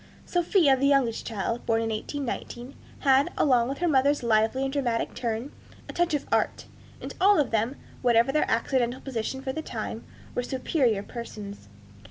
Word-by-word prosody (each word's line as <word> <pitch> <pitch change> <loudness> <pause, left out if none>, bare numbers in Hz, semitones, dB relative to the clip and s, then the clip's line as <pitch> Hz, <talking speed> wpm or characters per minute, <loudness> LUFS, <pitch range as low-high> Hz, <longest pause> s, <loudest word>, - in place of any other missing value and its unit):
Sophia, 345 -5 +3
the 275 +2 +1
youngest 270 -5 +2
child, 230 +2 -3
born 225 -1 +3
in 225 0 -1
1819, 245 +1 -5 0.3
had, 270 0 +4
along 250 -4 +3
with 275 - -3
her 350 - 0
mother's 285 -2 +3
lively 225 +3 +2
and 270 0 -2
dramatic 245 -5 -1
turn, 235 +2 -3 0.4
a - - -7
touch 345 -2 +1
of 285 - -3
art; - - 0 0.3
and - - -7
all 400 0 +6
of 285 - +1
them, 225 +4 0 0.3
whatever 235 0 +4
their 300 - +1
accidental 240 +1 +1
position 265 +1 -4
for 265 -1 -3
the 315 - -3
time, - - -5 0.3
were 245 - 0
superior 245 -4 0
persons. 205 - -8
260 Hz, 170 wpm, -27 LUFS, 230-280 Hz, 0.4 s, all